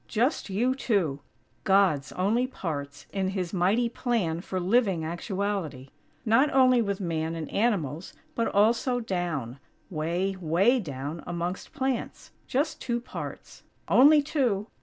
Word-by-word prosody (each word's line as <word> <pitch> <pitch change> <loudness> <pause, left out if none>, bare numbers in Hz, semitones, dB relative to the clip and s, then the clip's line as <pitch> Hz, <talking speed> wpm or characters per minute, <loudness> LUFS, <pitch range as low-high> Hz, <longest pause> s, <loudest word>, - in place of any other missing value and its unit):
Just 240 +2 0
you 235 +7 +1
two! 195 - 0 0.4
God's 190 -9 +3
only 220 +7 +1
parts 145 - -5
in 195 -1 0
His 190 -2 -3
mighty 200 +7 +2
plan 225 -9 -1
for 185 0 -3
living 190 -3 +2
actuality. 175 - -3 0.4
Not 250 +6 +4
only 255 -2 +5
with 200 -3 -2
Man 165 -3 -2
and 160 -2 -4
animals, 180 - -1 0.2
but 230 - 0
also 230 +4 +2
down, 170 - -3 0.3
way, 175 +4 -1
way 190 +10 +3
down 145 - -5
amongst 175 +2 -4
plants. 260 -2 -3 0.2
Just 285 +5 -1
two 240 -2 -1
parts. 240 - -8 0.3
Only 290 +3 +6
two!! 250 -9 0
195 Hz, 130 wpm, -27 LUFS, 165-235 Hz, 0.4 s, Only